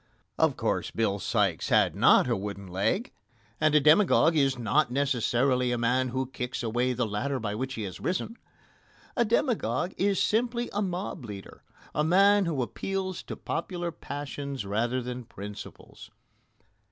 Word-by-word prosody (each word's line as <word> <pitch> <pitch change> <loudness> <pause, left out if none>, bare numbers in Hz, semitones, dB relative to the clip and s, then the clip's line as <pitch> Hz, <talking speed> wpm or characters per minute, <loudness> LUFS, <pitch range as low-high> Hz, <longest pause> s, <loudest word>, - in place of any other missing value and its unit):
Of - - +3
course, - - -1
Bill 105 -3 0
Sikes - - 0
had - - +3
not - - +5
a - - +1
wooden 100 0 -5
leg, 100 - -1 0.5
and 155 -1 +3
a - - +8
demagogue 160 +2 +5
is 135 -3 +2
not 125 +5 +2
necessarily 125 -1 +1
a 120 - 0
man 125 +2 +1
who 130 +1 -2
kicks 125 -1 -4
away 120 +3 0
the 125 0 0
ladder 130 +6 -2
by 105 -3 -3
which 130 +4 -3
he 110 - -4
has 95 -3 -6
risen. 185 +5 -2 0.8
A 240 - +3
demagogue 210 - 0
is 200 0 +1
simply 235 +2 0
a 205 - 0
mob 180 -5 -3
leader 100 -4 -9 0.3
a 150 - +1
man 195 +4 +5
who 145 -6 0
appeals 190 +7 -3
to - - -7
popular 175 0 -3
passions 140 -4 -6
rather 120 +5 -1
than 125 0 -5
principles. 105 -3 -10
130 Hz, 155 wpm, -28 LUFS, 115-175 Hz, 0.8 s, a